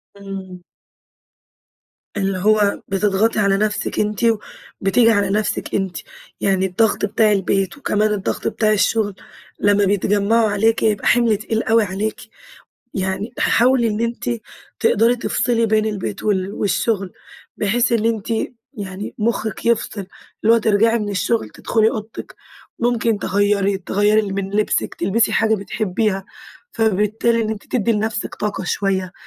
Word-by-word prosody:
امم. 195 -2 -8 1.5
اللي 195 -1 0
هو 205 +1 +2
بتضغطي 205 +3 +1
على 200 -1 +3
نفسِك 210 0 -1
أنتِ، 210 -1 -1 0.6
وبتيجي 225 +4 +4
على 205 -3 +1
نفسِك 210 +2 -1
أنتِ، 190 -4 -2 0.4
يعني 190 -1 +2
الضغط 205 +3 +1
بتاع 215 +1 +2
البيت 195 +1 0
وكمان 215 -6 0
الضغط 195 -2 -2
بتاع 215 -1 +1
الشغل، 210 -1 +1 0.4
لمّا 205 0 +3
بيتجمعوا 205 +3 +2
عليكِ 220 +2 +1
يبقى 210 -3 +1
حمل 235 -3 +3
تقيل 220 +2 -2
أوي 225 0 +3
عليكِ، 205 +3 -3 0.8
يعني 190 +4 -2
حاولي 245 -1 +3
إن 210 0 -2
أنتِ 235 +1 -2 0.5
تقدري 230 +3 +3
تفصلي 230 -1 0
بين 215 0 +2
البيت 190 - -4
وال 195 -2 0
والشغل، 195 0 -1 0.4
بحيث 235 +4 +1
إن 225 -2 +1
أنتِ 225 -3 -1 0.5
يعني 200 -2 -6
مخِّك 220 -1 -2
يفصل، 220 -4 0 0.4
اللي 225 +2 +6
هو - - +4
ترجعي 225 +1 +3
من 210 -2 -3
الشغل 205 +3 -1
تدخلي 220 -1 +1
أوضتِك، 220 0 -7 0.4
ممكن 235 -2 +1
تغيري 200 0 +1
تغيري 205 +2 +1
من 195 0 -3
لبسِك، 210 0 0
تلبسي 205 +6 +1
حاجة 220 -1 +3
بتحبيها، 200 -1 -2 0.5
فبالتالي 220 +2 +1
إن 215 - -2
أنتِ 215 -2 -6
تدّي 235 -2 +2
لنفسك 220 +1 -2
طاقة 205 -2 -3
شويّة، 190 -1 -1
210 Hz, 135 wpm, -20 LUFS, 195-225 Hz, 1.5 s, اللي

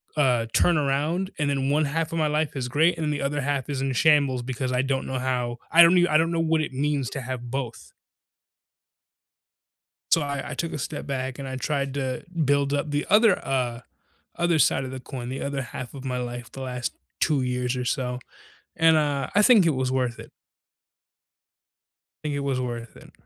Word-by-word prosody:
uh, 125 -6 +2
turn 175 -2 +4
around 150 +7 0
and 145 -1 +1
then 135 -1 0
one 150 +1 +2
half 160 +3 -2
of 165 - -1
my 155 - +2
life 150 0 -1
is 130 -3 -2
great 160 +6 +2
and 155 -2 0
the 145 - -2
other 145 +1 -1
half 140 -1 -1
is 140 -3 -3
in 135 - 0
the 135 - -1
shambles 140 -3 +3
because 130 +1 -3
I 125 0 +1
don't 135 0 -1
know 130 - -2
how 125 -2 -1
I 170 - +8
don't 170 +2 +7
I 155 - +4
don't 165 +1 +2
know 165 - 0
what 160 -1 +2
it 155 - -3
means 140 -1 -1
to 135 - -4
have 125 -1 -5
both. 130 -3 -5 2.2
So 165 - +5
I 140 -1 -3
I - - -4
took 165 +3 -3
a - - -3
step 150 +1 -5
back 130 -2 -3
and 135 - -5
I 130 - -4
tried 140 0 -2
to 130 -2 -2 0.2
build 140 0 +2
up 145 +1 -1
the 145 0 0
other, 210 -1 +5
uh, 125 -3 -1 0.6
other 170 -1 +2
side 135 -1 +3
of 130 - -6
the 130 - -6
coin. 125 -1 -7
The 130 +2 -4
other 140 -1 -2
half 125 +1 -7
of 135 -1 -8
my 125 -1 -2
life 120 0 -5
the 135 - -9
last 125 -2 -3 0.3
2 150 -5 +2
years 125 0 -1
or 125 - -2
so. 125 -1 -2 0.6
And, 160 0 +5
uh, 145 -2 0
I 205 - +5
think 215 -4 +6
it - - +5
was 130 -1 -1
worth 125 -2 -1
it. - - -11 1.9
Think 150 -2 -2
it - - -1
was 135 -2 -1
worth 120 -2 -5
it. - - -15
140 Hz, 210 wpm, -25 LUFS, 130-150 Hz, 2.2 s, I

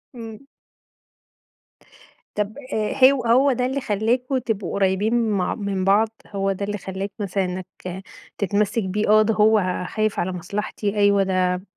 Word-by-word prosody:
إمم. 230 +2 -9 1.9
طب 210 +1 -1 0.2
آآ، 215 -1 -1 0.2
هو 270 -3 -2
هو 260 +4 +4
ده 250 0 0
اللي 265 +2 -2
خلاكم 245 +4 0
تبقوا 220 -7 -3
قريبين 205 +4 +1
مع 190 -4 0
من 200 -3 -2
بعض، 210 +3 +4 0.2
هو 195 -1 -1
ده 195 +1 -3
اللي 205 +1 -3
خلاك 190 +1 -5
مثلًا 195 -1 -1
إنّك 180 0 -5 0.7
تتمسك 205 +2 0
بيه؟ 200 +3 -1
آه، 215 0 +7
ده 220 +1 +2
هو 210 -4 +2
خايف 215 -1 -1
على 185 - -1
مصلحتي 200 +3 -4
أيوه 200 -1 +4
ده 185 -1 0
205 Hz, 150 wpm, -22 LUFS, 195-225 Hz, 1.9 s, آه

